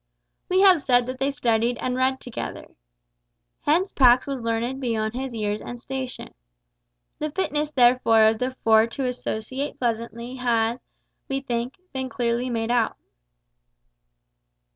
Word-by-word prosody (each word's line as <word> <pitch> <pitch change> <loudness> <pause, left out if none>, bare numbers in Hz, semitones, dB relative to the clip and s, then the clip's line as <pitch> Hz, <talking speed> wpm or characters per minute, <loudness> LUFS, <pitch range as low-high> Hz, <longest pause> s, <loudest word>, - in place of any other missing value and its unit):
We 370 +1 +3
have 375 -5 +6
said 245 -2 +3
that 255 +1 -6
they 270 +1 +1
studied 235 -3 +1
and 250 0 -2
read 260 +1 +1
together. 245 - -6 1.0
Hence 345 +6 +1
Pax 250 -2 +5
was 275 -3 -4
learned 230 +4 -2
beyond 220 -3 -1
his 260 -1 -4
years 210 -1 -2
and 245 - -7
station. 260 0 -6 0.9
The 305 - -2
fitness 300 -3 -1
therefore 240 -5 +4
of 220 0 +4
the 255 +1 -2
four 220 0 +5
to 260 +3 -4
associate 250 +2 -4
pleasantly 235 +1 -3
has, 235 -1 +1 0.5
we 270 0 -1
think, 240 -1 -3 0.2
been 260 -1 -3
clearly 240 0 -1
made 230 -1 -1
out. 235 -2 +1
245 Hz, 140 wpm, -24 LUFS, 230-265 Hz, 1.0 s, have